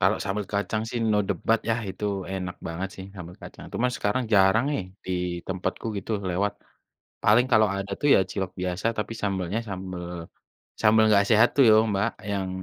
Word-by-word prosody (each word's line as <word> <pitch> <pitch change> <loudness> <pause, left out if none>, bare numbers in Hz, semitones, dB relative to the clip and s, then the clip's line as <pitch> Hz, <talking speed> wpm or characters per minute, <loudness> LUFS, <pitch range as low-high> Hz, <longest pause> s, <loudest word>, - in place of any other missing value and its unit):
kalau - - +3
sambal 105 +1 -2
kacang 105 +2 -1
sih, 120 - -3
no 105 - +3
debat 105 +4 +1
ya, - - +3
itu 95 +2 -6 0.3
enak 90 -1 -4
banget 85 +4 -4
sih 95 - -8
sambel 90 -1 -9
kacang. - - -10
Cuman 125 +1 +1
sekarang 125 +5 0
jarang 100 +5 +5
nih, 145 - -1 0.2
di - - -5 0.4
tempatku 95 +4 -3
gitu 100 - -8 0.2
lewat. 100 +4 0 0.7
Paling 120 +4 +5
kalau 110 -1 +5
ada 100 0 -4
tuh 145 - +2
ya - - +6
cilok 95 -2 -3
biasa, 90 +3 -2
tapi 105 - -2
sambelnya 95 0 -1
sambel 95 -2 -5 0.8
sambel 110 0 +5
enggak 100 -2 +5
sehat 110 +2 +6
tuh 140 - +7
yo, - - +8 0.2
Mbak, 100 0 +1 0.2
yang 95 -2 -2
100 Hz, 180 wpm, -26 LUFS, 95-110 Hz, 0.8 s, yo